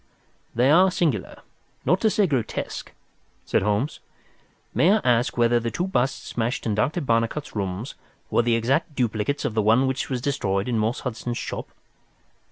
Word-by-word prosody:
"They 125 +4 +4
are 185 +4 +6
singular, 155 - -1 0.4
not 180 - +2
to 220 - +4
say 210 -1 +3
grotesque," 135 - -3 0.5
said - - +1
Holmes. 105 +9 0 0.7
"May 180 +5 +4
I 215 - +3
ask 120 -1 +2
whether 120 0 +4
the 115 0 -2
two 175 +9 -2
busts 135 -8 -1
smashed 120 +2 -2
in 110 - 0
Dr. 140 - 0
Barnicot's 115 +2 -1
rooms 100 +3 -3 0.4
were - - +4
the 120 -1 +2
exact 135 +7 0
duplicates 120 +3 -1
of - - -1
the 110 - +2
one 115 +5 +4
which 130 0 -2
was 130 -2 -1
destroyed 100 -7 -1
in 120 -3 0
Morse 110 +3 0
Hudson's 120 0 -4
shop?" - - -5
120 Hz, 170 wpm, -24 LUFS, 115-140 Hz, 0.7 s, are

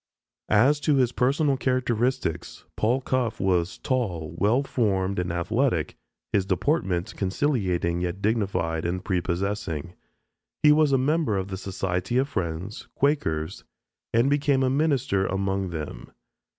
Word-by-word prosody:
As 130 +8 +4
to 145 0 +2
his 125 -3 +3
personal 135 +3 +2
characteristics: 125 -9 -1
Paul 120 +5 +1
Cuffe 125 -3 -1
was 90 -2 +1
"tall, 90 - -2
well 115 +7 +3
formed 100 -7 0
and 90 -1 -1
athletic, 90 - 0 0.4
his 100 - +3
deportment 95 - 0
conciliating 95 - 0
yet 90 +1 -2
dignified 100 -7 0
and 90 +1 -2
prepossessing. 90 -3 -2 0.7
He 150 - +8
was 150 -1 +4
a 135 - +4
member 140 -4 +1
of 95 0 -3
the 95 - -3
Society 95 +2 -2
of 135 +2 +2
Friends 95 - -4
(Quakers) 80 - 0 0.5
and 115 +3 +3
became 140 -1 +2
a 130 - +2
minister 135 -9 +1
among 95 0 -1
them.... 75 -7 -6
100 Hz, 130 wpm, -25 LUFS, 90-130 Hz, 0.7 s, He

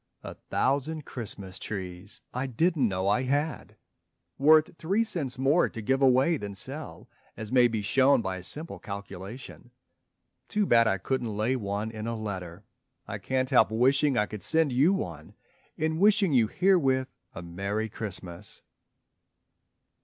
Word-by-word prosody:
A - - -7 0.2
thousand 145 +3 0
Christmas 100 -6 -4
trees 95 0 -6
I 130 +2 -2
didn't 150 +1 +1
know 95 -1 -2
I 105 +5 +2
had! 145 +4 -2 0.6
Worth 155 +3 +5
three 195 +8 +1
cents 160 - -3
more 140 +6 +3
to 115 - -8
give 135 +5 0
away 135 +5 +4
than 100 -5 -6
sell, 130 - -2 0.3
As 110 -1 -7
may 125 -1 +5
be 110 -3 -3
shown 135 +6 +4
by 95 -1 -3
a - - -8
simple 155 - -4
calculation. 100 +4 -9 0.8
Too 210 -1 0
bad 115 -7 +4
I 95 - +1
couldn't 115 +1 -3
lay 115 +5 +1
one 105 -1 -3
in 110 0 -6
a 115 - -2
letter. 95 -3 -6 0.4
I - - -5
can't 130 0 -1
help - - +5
wishing 135 +4 +2
I 105 - +3
could 105 -1 -8
send 160 -3 +2
you 140 +9 +4
one, 85 - -4 0.4
In 160 +1 -1
wishing 200 -4 +4
you 120 -4 +4
herewith 135 - +2 0.2
a 85 - -7
Merry 100 +6 -3
Christmas. 95 -5 -5
125 Hz, 155 wpm, -28 LUFS, 100-145 Hz, 0.8 s, Worth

